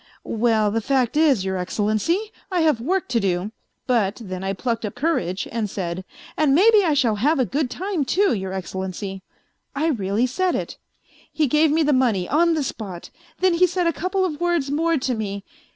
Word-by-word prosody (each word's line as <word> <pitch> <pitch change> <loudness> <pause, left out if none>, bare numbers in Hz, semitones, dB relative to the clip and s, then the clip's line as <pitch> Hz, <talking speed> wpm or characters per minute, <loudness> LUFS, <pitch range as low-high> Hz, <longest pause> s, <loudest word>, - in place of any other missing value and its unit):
" - - -27
' - - -39 0.2
Well, 220 -3 +3
the 225 +2 0
fact 260 0 +1
is, 285 -11 +3
Your 190 0 -1
Excellency, 215 - -1 0.2
I 360 -2 +1
have 305 -8 +2
work 370 +9 0
to 240 -2 +2
do,' 190 0 -1 0.3
but 225 -5 +1
then 185 -4 -6
I 195 - -1
plucked 230 +4 -2
up 210 - -4
courage 195 - -1
and 220 -2 -2
said: 185 -1 -4 0.2
' - - -19
and 290 -3 +4
maybe 420 +4 +6
I 320 -5 +2
shall 235 -6 +2
have 295 +9 +2
a 260 - +2
good 275 - -1
time, 370 +1 -2
too, 390 +7 +2
Your 190 -3 -3
Excellency.' 190 +1 -5 0.5
I 310 +4 +1
really 210 -3 0
said 360 +8 0
it. - - -4 0.5
He 310 - +1
gave 300 +4 +3
me 320 +1 +3
the 295 0 +2
money, 230 -9 +2
on 335 +3 +3
the 305 - 0
spot, 195 -9 -6 0.3
then 370 -1 +4
he 360 +2 +4
said 360 0 -1
a 335 - +2
couple 370 +4 -1
of 315 -3 -4
words 340 -6 0
more 330 +2 +1
to 260 -1 -1
me. 200 -3 -4
255 Hz, 210 wpm, -22 LUFS, 200-325 Hz, 0.5 s, maybe